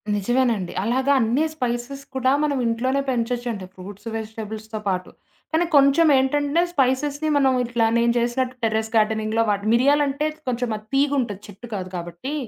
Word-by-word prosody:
నిజమేనండి. 225 -2 0
అలాగా 260 +5 +2
అన్ని 240 +8 +2
స్పైసెస్ 250 0 -3
కూడా 260 0 +2
మనం 290 -2 0
ఇంట్లోనే 255 +4 0
పెంచొచ్చండి. 240 -4 -2
ఫ్రూట్స్, 200 +3 -10
వెజిటబుల్స్‌తో 220 0 -6
పాటు. 185 -1 -2 0.4
కానీ 330 +2 +3
కొంచెం 280 +4 +5
ఏంటంటే 290 +4 +1
స్పైసెస్‌ని 285 +2 +1
మనం 270 -2 +3
ఇట్లా 235 -1 +1
నేను 235 0 +3
చేసినట్టు 250 +2 -1
టెర్రెస్ 220 0 0
గార్డెనింగ్‌లో 220 +1 +2
వాట 200 -1 +1
మిరియాలంటే 280 +3 +2 0.2
కొంచెం 245 -1 -1
అది 210 - -15
తీగుంటది 270 -8 +1
చెట్టు 205 +4 -11
కాదు 185 -2 -5
కాబట్టి, 175 - -6
240 Hz, 140 wpm, -23 LUFS, 220-275 Hz, 0.4 s, కొంచెం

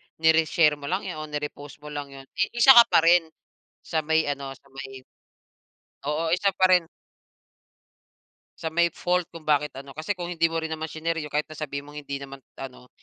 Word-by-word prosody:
ni-reshare 160 -1 +3
mo 140 - -7
lang 185 +3 -1
yun 180 -5 -5
o 155 - -6
ni-repost 150 -1 -6
mo 150 - -8
lang 145 -1 -5
yun, 135 -1 -12 0.2
eh, - - +3
isa 240 +3 +8
ka 235 -2 +9
pa 165 - +4
rin 170 0 +5 0.6
sa 160 - -1
may 160 0 +3
ano, 140 -1 -4
sa 140 - -27
may 135 -1 -9 1.1
Oo 160 +2 -1
isa 195 +3 +2
pa 190 - +3
rin 175 -3 +4 1.7
sa 160 - -4
may 170 +1 +3
fault 180 +1 -1
kung 165 -2 -11
bakit 150 0 +2
ano. 135 0 -10
Kasi 160 +7 -3
kung 175 -1 -5
hindi 165 -1 +2
mo 165 - -3
rin 160 0 -3
naman 160 0 -4
shinare 165 +1 -2
yun, 150 - -7
kahit 150 +1 -1
na 155 - -10
sabihin 140 -2 -5
mong 145 0 -10
hindi 140 -1 -5
naman 135 0 -10 0.2
ano, 125 -1 -9
155 Hz, 205 wpm, -25 LUFS, 145-165 Hz, 1.7 s, ka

